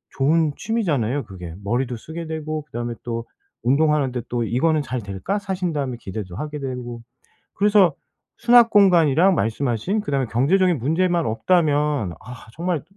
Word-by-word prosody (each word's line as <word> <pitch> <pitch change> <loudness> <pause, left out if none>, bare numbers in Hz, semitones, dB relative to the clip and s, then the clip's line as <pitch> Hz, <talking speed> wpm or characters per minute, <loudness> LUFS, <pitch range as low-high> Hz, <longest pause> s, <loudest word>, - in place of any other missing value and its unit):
좋은 150 +2 +2
취미잖아요, 145 - -1
그게. 90 -4 -9
머리도 120 +4 -1
쓰게 160 +7 -7
되고 155 -1 -4
그다음에 120 -4 -4
또 115 -1 -4 0.4
운동하는데 140 -1 +2
또 120 -1 -1
'이거는 150 +7 +1
잘될까?' 120 - -3
사신 190 -4 -3
다음에 135 -4 -2
기대도 95 -3 -7
하게 150 0 -5
되고. 125 -3 -5 0.5
그래서 200 -5 +4 0.4
수납 235 -1 +6
공간이랑 180 -3 +5
말씀하신 120 - -1
그다음에 140 -6 -1
경제적인 170 +8 +2
문제만 170 +6 +1
없다면 145 - +1
아 125 +1 -11
정말 170 -3 -1
145 Hz, 345 characters per minute, -22 LUFS, 120-175 Hz, 0.5 s, 수납